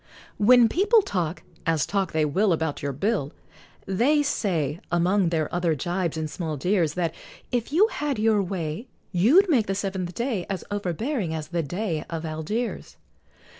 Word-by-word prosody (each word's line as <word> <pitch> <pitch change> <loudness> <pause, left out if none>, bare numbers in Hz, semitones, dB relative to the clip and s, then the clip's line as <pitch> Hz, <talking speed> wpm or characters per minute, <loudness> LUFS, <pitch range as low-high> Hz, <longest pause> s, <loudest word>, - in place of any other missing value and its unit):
When 240 +3 +7
people 410 - +3
talk, 175 - -2 0.2
as 160 -3 +1
talk 195 -3 -1
they 155 -1 +1
will, 185 +6 +2
About 160 -2 -2
your 140 - -2
bill, 150 - -1 0.5
They 260 +11 +2
say, 170 - -1
among 180 +2 +2
their 160 -3 0
other 175 -2 +1
jibes 175 +2 -2
and 160 -1 -2
small 155 -1 -4
jeers, 170 0 +1
That, 170 -3 -1 0.4
if 245 0 -1
you 355 +8 +5
had 295 - -2
your 215 -1 +3
way, 180 +3 -4 0.2
You'd 250 - +5
make 255 - +2
the 195 - -1
seventh 190 -3 -3
day 235 -7 -2
As 195 -2 -3
overbearing 205 - -2
as 155 -1 -5
the 170 -1 0
Dey 170 +1 -3
of 165 -1 -4
Algiers. 160 +10 -4
185 Hz, 165 wpm, -25 LUFS, 160-220 Hz, 0.5 s, When